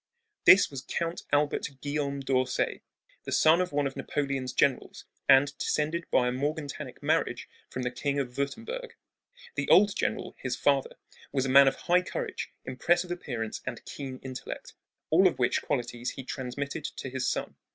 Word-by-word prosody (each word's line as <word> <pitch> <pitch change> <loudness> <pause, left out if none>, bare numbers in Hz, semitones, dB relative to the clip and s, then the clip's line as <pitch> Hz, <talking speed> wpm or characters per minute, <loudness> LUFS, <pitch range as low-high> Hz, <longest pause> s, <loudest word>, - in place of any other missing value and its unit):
This 185 -3 +8
was 135 -3 -5
Count 170 +4 -3
Albert 145 0 +1
Guillaume 145 -1 -2
d'Orsay, 130 -1 0 0.4
the - - -5
son 160 +3 +5
of 180 - -2
one 145 0 +1
of 135 - -3
Napoleon's 135 -2 -2
generals, 130 0 0 0.2
and 140 +2 +6
descended 160 +3 -1
by 125 - +3
a - - +1
morganatic 145 +3 -4
marriage - - 0 0.2
from 130 - -4
the 125 - -1
King 140 +3 -2
of 125 -3 -2
Wurttemburg. 230 - -4 0.6
The - - -2
old 205 0 +6
general, - - -2
his 125 -1 -2
father, 140 +1 +1 0.4
was 135 -2 0
a - - -1
man 140 +1 +8
of 135 - +3
high 180 +1 +2
courage, 180 - -4 0.2
impressive 175 +7 +1
appearance, 120 -10 -4
and 130 -2 -6
keen 135 -2 -6
intellect, 130 -1 -7 0.4
all - - +6
of - - -1
which - - +2
qualities 120 0 -2
he 135 - -7
transmitted 140 +4 -4
to 140 -3 -5
his 130 -1 -1
son. - - -3
140 Hz, 165 wpm, -29 LUFS, 130-150 Hz, 0.6 s, This